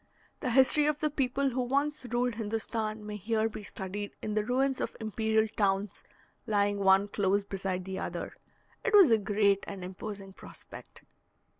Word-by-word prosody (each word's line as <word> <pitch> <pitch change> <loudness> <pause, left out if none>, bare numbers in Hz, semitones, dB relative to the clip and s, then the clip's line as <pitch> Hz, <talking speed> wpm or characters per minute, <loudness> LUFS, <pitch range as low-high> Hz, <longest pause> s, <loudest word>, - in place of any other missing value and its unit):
The 255 - -2
history 265 +4 +6
of 300 -1 0
the 305 -1 0
people 275 0 0
who 255 +1 -1
once 280 +2 -1
ruled 245 +1 0
Hindostan 220 0 -3
may 210 0 -5
here 220 +2 0
be 220 - -7
studied 200 +1 -6
in 215 - -2
the 215 0 +1
ruins 260 +3 0
of - - -4
imperial 220 0 +1
towns, 200 -1 -1 0.4
lying 205 -1 +1
one 195 +1 +4
close 200 0 +1
beside 190 -2 -4
the 190 0 -5
other. - - -5 0.5
It 465 - -1
was 385 - +8
a 225 - +5
great 200 -1 +2
and 195 -2 -7
imposing 195 +1 -7
prospect. - - -12
215 Hz, 165 wpm, -30 LUFS, 200-250 Hz, 0.5 s, was